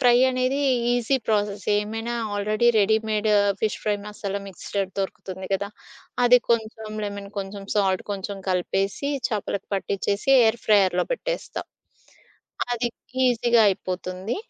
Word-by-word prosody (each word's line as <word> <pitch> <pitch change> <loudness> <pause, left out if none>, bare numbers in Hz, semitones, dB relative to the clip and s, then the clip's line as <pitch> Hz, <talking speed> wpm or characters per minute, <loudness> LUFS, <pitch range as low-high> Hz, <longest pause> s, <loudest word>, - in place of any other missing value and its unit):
Fry 245 -2 +6
అనేది 255 +2 0 0.3
easy 245 +2 +2
ప్రాసెసేమైనా. 210 +2 0 0.2
Already 215 +3 +2
readymade 215 +1 +2 0.3
fish 215 - 0
fry 210 -1 +1
masala 200 -1 -4
mixed 195 +2 -6 0.2
దొరుకుతుంది 190 -1 -4
గదా! 200 +1 0 0.6
అది 250 +1 +7
కొంచెం, 220 -1 -1
లెమన్ 200 -1 -5
కొంచెం, 195 0 -5
సాల్ట్ 190 -3 +2
కొంచెం, 200 +1 -4
కలిపేసి 195 +8 0 0.2
చేపలకు 205 -2 -3
పట్టించేసి 200 +3 -2
ఎయిర్ 225 +1 +3
ఫ్రైయర్‌లో 195 -4 +4
పెట్టేస్తా, - - -3 1.1
అది 240 0 0 0.4
ఈజీగా 240 -1 +4
అయిపోతుంది. 185 - -3
210 Hz, 110 wpm, -24 LUFS, 195-230 Hz, 1.1 s, అది